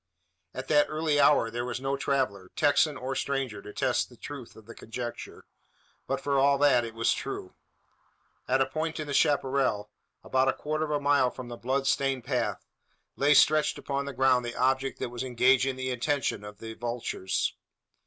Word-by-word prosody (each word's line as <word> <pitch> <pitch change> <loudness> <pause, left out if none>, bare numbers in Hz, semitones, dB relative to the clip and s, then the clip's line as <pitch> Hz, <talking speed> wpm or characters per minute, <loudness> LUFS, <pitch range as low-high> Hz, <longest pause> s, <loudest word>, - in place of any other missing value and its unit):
At 130 0 -5
that 150 -1 +4
early 155 -1 0
hour 130 -6 +4
there 120 +1 -3
was 125 0 -4
no 135 +1 -1
traveller 130 -9 -1
Texan, 145 0 +3
or 130 +1 -4
stranger 135 -5 -2
to 105 - -10
test 130 0 0
the 120 - -17
truth 140 -3 -9
of 110 - -15
the 115 - -10
conjecture; 120 +1 -7 0.6
but, - - -1
for 140 -1 0
all 140 +1 +4
that, 135 -4 +4
it 115 -1 -7
was 115 0 +2
true. - - -6 0.9
At 130 +1 +2
a - - +4
point 160 +2 -3
in 155 - -3
the 145 - -5
chapparal, 135 -8 +1 0.3
about 130 0 +1
a 135 - +3
quarter 155 +1 -2
of - - -7
a 150 -1 0
mile 145 -2 +3
from 125 -1 -9
the 120 - -6
blood 135 +3 -1
stained 135 -2 +1
path, 125 0 -2 0.5
lay 145 +2 +4
stretched 155 +1 +4
upon 140 0 -3
the 140 - -5
ground 130 -1 +3
the 120 0 -5
object 130 +1 +1
that - - -3
was 120 0 -6
engaging 130 +1 +3
the 130 0 -3
attention 125 -3 -1
of 105 0 -9
the 110 +1 -8
vultures. 115 -5 -2
130 Hz, 190 wpm, -28 LUFS, 120-140 Hz, 0.9 s, that